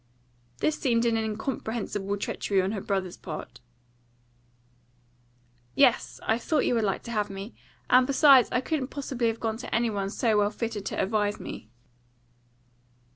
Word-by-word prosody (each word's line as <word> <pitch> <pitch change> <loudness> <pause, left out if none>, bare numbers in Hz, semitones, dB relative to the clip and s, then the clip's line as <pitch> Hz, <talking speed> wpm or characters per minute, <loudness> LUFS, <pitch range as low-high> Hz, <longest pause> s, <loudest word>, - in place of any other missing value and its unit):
This 310 - +1
seemed 235 -3 +2
an 230 -1 +2
incomprehensible 220 -2 -3
treachery 200 0 -1
on 190 +1 +1
her 210 -3 -3
brother's 190 -3 -2
part. - - -8 2.2
"Yes; 265 -4 +3
I 225 +1 +2
thought 300 +4 +1
you - - +2
would 230 -2 +1
like 195 -2 -1
to 235 - -7
have 210 -3 -1
me. 195 +3 -7 0.3
And 255 0 +5
besides, 275 -2 +6
I 250 - +1
couldn't 280 -2 -2
possibly 260 -4 -2
have 225 0 -1
gone 220 -1 -2
to 245 - -4
any 230 0 +1
one 200 -2 -2
so 220 0 +1
well 205 0 +3
fitted 215 -2 -4
to - - -3
advise 205 0 0
me." 110 - -8
225 Hz, 155 wpm, -27 LUFS, 205-245 Hz, 2.2 s, besides